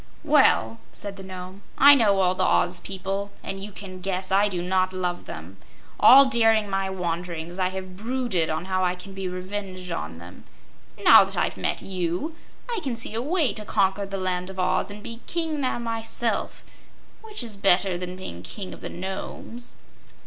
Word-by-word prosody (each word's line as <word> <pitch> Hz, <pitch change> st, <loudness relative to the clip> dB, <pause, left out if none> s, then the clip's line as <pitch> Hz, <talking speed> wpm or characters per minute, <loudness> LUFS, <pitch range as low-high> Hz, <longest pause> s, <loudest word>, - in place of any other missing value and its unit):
"Well," 110 Hz, +1 st, +4 dB
said 200 Hz, -1 st, -7 dB
the 195 Hz, -, -10 dB
Nome, 185 Hz, +1 st, -8 dB, 0.2 s
"I 285 Hz, +1 st, +9 dB
knew 255 Hz, -6 st, +4 dB
all 190 Hz, -2 st, +3 dB
the -, -, 0 dB
Oz 180 Hz, 0 st, +2 dB
people, 195 Hz, +1 st, -4 dB
and 195 Hz, 0 st, -5 dB
you 210 Hz, -, -6 dB
can 185 Hz, -2 st, -9 dB
guess 185 Hz, 0 st, -3 dB
I 200 Hz, +2 st, +4 dB
do 175 Hz, -3 st, -3 dB
not 185 Hz, +1 st, +1 dB
love 180 Hz, -1 st, -2 dB
them. 85 Hz, +4 st, -9 dB, 0.4 s
All 275 Hz, +2 st, +9 dB
during 225 Hz, -4 st, +3 dB
my 195 Hz, 0 st, 0 dB
wanderings 175 Hz, -1 st, -4 dB
I 185 Hz, -, +2 dB
have 185 Hz, 0 st, -6 dB
brooded 225 Hz, -6 st, 0 dB
on 155 Hz, +3 st, -2 dB
how 185 Hz, -1 st, 0 dB
I 180 Hz, 0 st, +1 dB
can 180 Hz, +2 st, -10 dB
be 190 Hz, -1 st, -4 dB
revenged 185 Hz, 0 st, -5 dB
on 80 Hz, -, -4 dB
them. 85 Hz, +1 st, -12 dB, 0.6 s
Now -, -, +9 dB
that -, -, -3 dB
I've -, -, 0 dB
met -, -, -2 dB
you 185 Hz, -, -2 dB, 0.3 s
I 470 Hz, -3 st, -1 dB
can 265 Hz, -6 st, -2 dB
see 230 Hz, -2 st, -4 dB
a 225 Hz, -, -1 dB
way 300 Hz, -, +1 dB
to 215 Hz, -, -6 dB
conquer 200 Hz, -1 st, +1 dB
the 195 Hz, 0 st, -4 dB
Land 185 Hz, -1 st, -2 dB
of 190 Hz, -, -9 dB
Oz 185 Hz, -, +1 dB
and 205 Hz, +1 st, -9 dB
be 230 Hz, 0 st, -6 dB
King 320 Hz, -3 st, -1 dB
there 255 Hz, -, 0 dB
myself, 230 Hz, 0 st, -3 dB, 0.6 s
which 430 Hz, -, -5 dB
is 225 Hz, -3 st, -6 dB
better 190 Hz, -1 st, +3 dB
than 180 Hz, +1 st, -4 dB
being 90 Hz, -, -7 dB
King 190 Hz, -, -6 dB
of -, -, -12 dB
the -, -, -5 dB
Nomes." 190 Hz, +6 st, -6 dB
190 Hz, 190 wpm, -25 LUFS, 180-215 Hz, 0.6 s, I